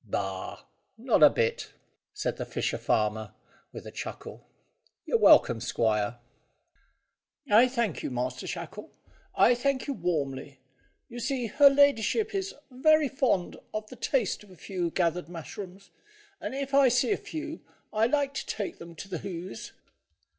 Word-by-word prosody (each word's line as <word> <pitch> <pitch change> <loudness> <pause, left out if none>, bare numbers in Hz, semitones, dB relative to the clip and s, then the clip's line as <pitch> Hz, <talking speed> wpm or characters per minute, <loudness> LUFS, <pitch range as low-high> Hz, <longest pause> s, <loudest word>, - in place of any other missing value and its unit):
"Bah! - - -4 0.3
Not 235 -5 +2
a 150 - +10
bit," 115 -4 -1 0.4
said - - -3
the - - -4
fisher - - -2
farmer, 105 -1 0 0.4
with - - -9
a - - -8
chuckle. - - -8 0.6
"You're - - +1
welcome, 115 -2 +6
squire." 110 -1 0 1.3
"I 235 +2 +6
thank 235 - -1
you, - - -3
Master 125 0 -3
Shackle 170 +4 -6 0.5
I 245 - +6
thank 260 +2 0
you 280 - -2
warmly. 145 - -3 0.5
You 240 0 -8
see 255 0 -1
her 280 +6 +6
ladyship 285 - +3
is 390 0 -3 0.2
very 305 +3 +4
fond 245 -10 0 0.2
of 215 0 -3
the - - -8
taste 240 -5 -1
of 205 - -18
a 185 - -14
fresh 185 +2 -8 0.2
gathered 175 -2 0
mushroom, 180 +3 -8 0.6
and - - -5
if 275 0 -4
I 275 -1 +6
see 245 - +2
a - - +4
few 320 -6 -6 0.3
I 220 +1 +3
like 280 +1 0
to - - -4
take 205 -3 -4
them 170 0 -10
to 195 - -8
the 180 -4 -4
Hoze." 185 -1 -7
215 Hz, 155 wpm, -28 LUFS, 165-275 Hz, 1.3 s, a